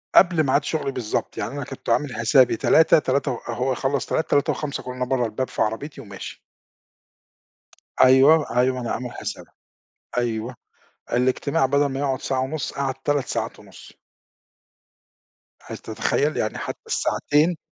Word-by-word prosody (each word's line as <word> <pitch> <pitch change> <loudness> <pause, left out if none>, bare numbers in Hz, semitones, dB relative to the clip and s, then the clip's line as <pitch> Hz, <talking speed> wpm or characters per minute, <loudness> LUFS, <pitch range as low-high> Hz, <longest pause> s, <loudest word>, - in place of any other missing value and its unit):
قبل 175 -4 +6
ميعاد 135 +2 +2
شغلي 150 -4 -2
بالضبط، 120 -5 -3
يعني - - -3
أنا - - -4
كنت - - -8
عامل 145 -4 +1
حسابي 120 0 +4
15:00، 160 0 +5
تلاتة 135 0 0
و 120 - -3
هو 125 +3 -1
يخلّص 135 +2 -1
15:00، 160 - -1
15:05 145 0 0
اكون 125 0 -7
أنا 125 - -2
برّا 125 -1 0
الباب 115 +4 -3
في - - -4
عربيتي 115 +7 -2
وماشي. 100 -2 -9 1.6
أيوه، 135 +2 +5
أيوه 130 +1 +2
أنا 120 -2 -4
عامل 125 -1 -4
حسابها. - - -7 0.6
أيوه، 120 0 -2 0.6
الاجتماع 130 +4 +1
بدل 140 +2 +2
ما 135 -1 -3
يقعُد 135 -2 -1
ساعة 130 - -1
ونُص، 140 +2 -3
قعد 135 -1 -1
3 135 +1 -1
ساعات - - -3
ونُص. - - -14 1.7
هل - - -7
تتخيل؟ - - -1
يعني - - -1
حتى - - -5
الساعتين 155 +4 +1
130 Hz, 150 wpm, -23 LUFS, 125-145 Hz, 1.7 s, قبل